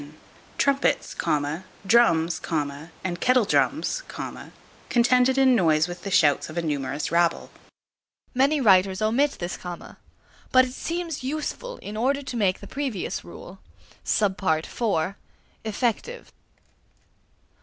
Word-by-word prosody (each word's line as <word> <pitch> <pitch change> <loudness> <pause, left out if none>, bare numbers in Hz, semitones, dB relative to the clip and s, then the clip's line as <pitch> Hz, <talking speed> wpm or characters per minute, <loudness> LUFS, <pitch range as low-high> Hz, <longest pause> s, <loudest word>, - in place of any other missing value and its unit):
Trumpets, 280 0 +1 0.7
drums, 175 -7 +3 0.6
and 175 -2 -3
kettle 250 -3 +4
drums, - - +1 0.9
contended 250 +2 +3
in 265 -2 +5
noise 160 -5 +3
with 175 0 -7
the 200 - -5
shouts 155 -8 +3
of 155 - -8
a 170 - 0
numerous 145 -2 -2
rabble. 170 0 +1 0.8
Many 275 +4 +3
writers 190 -5 +4
omit 250 +7 +2
this 175 +1 -5
comma. 175 -1 -9 0.5
But 255 0 +6
it 250 - -7
seems 330 -2 -4
useful 310 - -4
in 210 - -6
order 275 +5 0
to 260 - -6
make 195 -5 +1
the - - -9
previous 265 -9 -3
rule 180 +2 -11 0.4
(d) 215 - +2 1.4
effective. 240 - -2
220 Hz, 110 wpm, -25 LUFS, 175-270 Hz, 1.4 s, But